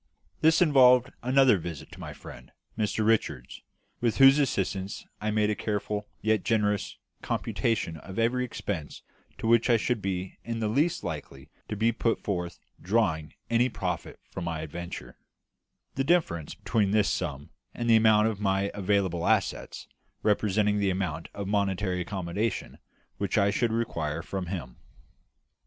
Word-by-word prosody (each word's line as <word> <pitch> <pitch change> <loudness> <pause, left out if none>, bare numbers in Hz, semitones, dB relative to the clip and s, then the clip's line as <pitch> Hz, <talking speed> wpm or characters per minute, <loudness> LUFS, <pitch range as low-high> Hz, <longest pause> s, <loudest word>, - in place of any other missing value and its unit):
This 160 +2 +5
involved 125 -5 +5
another 130 -4 +4
visit 80 -3 -7
to - - -12
my - - -6
friend, 60 +1 -12 0.2
Mr 110 0 0
Richards, 110 0 0 0.4
with 120 -2 0
whose 135 +1 +8
assistance 100 -7 -1 0.2
I 105 - -1
made 105 0 +2
a - - 0
careful 105 0 -3 0.2
yet 110 -2 +2
generous 105 -3 0 0.2
computation 110 -8 -1
of 95 +5 -10
every 120 +2 +2
expense 100 -10 -5 0.3
to - - -6
which 115 +1 +4
I 120 - +6
should 115 0 -1
be 95 -1 -4
in 115 -1 -3
the 110 - 0
least 150 +9 +1
likely 75 -2 -7 0.2
to 105 - -2
be 115 +3 +3
put 115 0 0
before 90 -4 -1 0.3
drawing 90 -7 0
any 120 +2 +3
profit 90 -7 -4
from 90 - -5
my 80 -2 -3
adventure; 80 -5 -7 0.7
the 135 - 0
difference 135 - +1
between 105 -4 0
this 105 0 +3
sum 75 -5 -4 0.2
and 120 - -3
the 115 - +6
amount 110 -1 +5
of 110 -3 -2
my 95 0 +1
available 95 -4 0
assets - - 0 0.4
representing 105 0 +2
the 100 -1 +2
amount 90 -4 -2
of 100 -1 -4
monetary 95 -2 0
accommodation 95 +4 -3 0.4
which 100 0 -1
I 100 -1 +4
should 115 +2 +1
require 85 -9 -2
from 95 -2 -4
him. 75 -10 -6
105 Hz, 150 wpm, -28 LUFS, 90-115 Hz, 0.7 s, whose